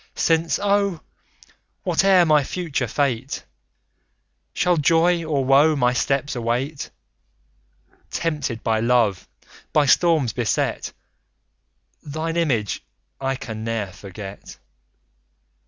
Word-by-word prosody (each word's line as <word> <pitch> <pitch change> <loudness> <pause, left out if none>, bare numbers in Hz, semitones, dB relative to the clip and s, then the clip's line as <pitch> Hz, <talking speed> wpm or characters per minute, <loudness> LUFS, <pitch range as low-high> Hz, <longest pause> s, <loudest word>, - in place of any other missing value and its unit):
Since, 165 0 +2
oh! 200 -4 +1 0.8
whate'er 185 0 +4
my 150 -2 +4
future 145 -5 -3
fate, 130 +1 -2 1.1
Shall 180 -1 +1
joy 165 +3 +3
or 145 -4 -1
woe 145 +4 +5
my 125 -3 +2
steps 135 +3 0
await; 125 +5 -2 1.2
Tempted 150 -8 -3
by 110 -2 +1
love, 115 -4 +1 0.5
by 150 -1 +4
storms 155 -5 +3
beset, 120 -3 -1 1.1
Thine 155 +2 -4
image, 130 - 0 0.4
I 135 0 -1
can 110 -4 -7
ne'er 110 -4 -3
forget. 100 0 -10
140 Hz, 95 wpm, -22 LUFS, 120-165 Hz, 1.2 s, woe